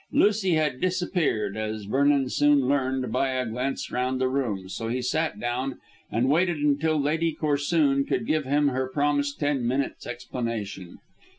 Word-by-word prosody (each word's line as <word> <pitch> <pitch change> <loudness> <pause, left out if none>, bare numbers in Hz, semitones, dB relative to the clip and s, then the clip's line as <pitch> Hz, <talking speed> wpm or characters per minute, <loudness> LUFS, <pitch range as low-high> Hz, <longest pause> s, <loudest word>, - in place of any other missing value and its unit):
Lucy 200 -4 +3
had 150 -5 0
disappeared, 180 - 0
as 110 0 -3
Vernon 140 +5 +2
soon 145 -1 +3
learned 130 -2 0
by 130 +3 +1
a 130 -1 -1
glance 125 +4 -3
round 130 +1 -1
the 130 - +2
room, 120 -8 -2
so 105 +4 -5
he 125 +2 -1
sat 155 +6 -1
down 125 +2 -2 0.3
and 115 +4 +1
waited 170 +4 +2
until 150 +2 +1
Lady 160 +3 0
Corsoon 145 -1 +2
could - - -1
give 155 0 +1
him 145 +2 +2
her 130 0 -2
promised 145 0 0
ten 145 -3 0
minutes' 130 +3 -2
explanation. 115 -6 -5
135 Hz, 160 wpm, -26 LUFS, 125-150 Hz, 0.3 s, Lucy